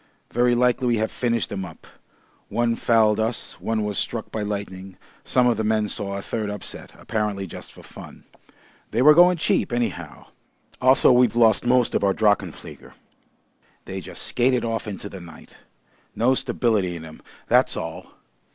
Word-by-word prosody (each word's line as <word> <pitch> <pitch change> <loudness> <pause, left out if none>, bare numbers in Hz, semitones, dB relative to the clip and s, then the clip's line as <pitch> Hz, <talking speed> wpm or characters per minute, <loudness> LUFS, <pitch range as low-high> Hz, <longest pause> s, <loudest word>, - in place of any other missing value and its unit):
Very 120 +1 +2
likely 125 +1 +2
we 120 -1 +2
have 110 +1 -1
finished 115 -3 -1
'em 95 -1 -3
up. 85 -4 -11 0.6
One 120 0 0
fouled 110 -2 +3
us, 110 +1 -2
one 110 -1 -1
was 105 -1 -1
struck 115 -2 -3
by 110 - -3
lightning, 95 -2 -5 0.3
some 125 -1 +2
of 120 -1 +2
the 110 - -1
men 110 0 +1
saw 100 -2 -4
a 100 - -6
third 110 -3 -3
upset, 105 0 -7
apparently 105 -3 -3
just 90 - -10
for - - -15
fun. - - -12 0.7
They 115 +4 +1
were 150 +2 +8
going 175 +2 +6
cheap 155 - 0
anyhow. 90 - -3 0.6
Also 130 +1 +5
we've 125 -3 +4
lost 115 0 +4
most 125 -1 +3
of - - 0
our 100 -1 +2
drachenflieger. 105 -5 -1 0.9
They 95 0 -6
just - - -6
skated 125 0 +1
off 115 -1 -3
into 100 0 -6
the 95 -2 -9
night. 85 -2 -14 0.6
No 125 +3 +3
stability 115 -8 0
in 80 -1 -8
'em. 80 - -13 0.3
That's - - +3
all. - - -6
110 Hz, 170 wpm, -23 LUFS, 100-120 Hz, 0.9 s, were